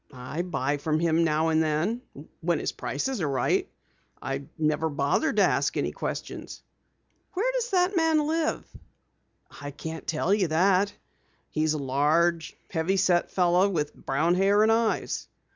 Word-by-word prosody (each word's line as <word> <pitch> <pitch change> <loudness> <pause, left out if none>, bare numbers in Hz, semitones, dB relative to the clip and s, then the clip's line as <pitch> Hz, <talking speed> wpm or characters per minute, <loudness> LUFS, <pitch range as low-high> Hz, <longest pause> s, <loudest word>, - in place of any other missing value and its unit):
"I 135 +5 -5
buy 145 -5 -1
from 155 +2 -1
him 165 0 +2
now 160 0 +1
and 160 0 +3
then, 160 +10 0 0.4
when - - 0
his - - -2
prices 265 -6 -3
are 150 - 0
right. 135 -2 0 0.5
I 135 +1 -4
never 155 0 +1
bothered 145 - 0
to - - +5
ask - - +1
any - - 0
questions." - - -6 0.7
"Where 455 +7 +1
does - - -2
the 365 0 +2
man 320 -3 +3
live?" 320 +1 -1 1.0
"I 145 - -5
can't 160 +3 -7
tell 165 +4 +1
you 200 -4 +2
that. 185 +5 +3 0.6
He's 155 0 +1
a - - -1
large, 150 +5 +1
heavy 175 +3 0
set 180 -2 +2
fellow 180 +2 +3
with 150 -6 -2
brown 155 +6 0
hair 200 +3 +4
and 220 - +4
eyes." 225 0 0
170 Hz, 155 wpm, -26 LUFS, 155-205 Hz, 1.0 s, to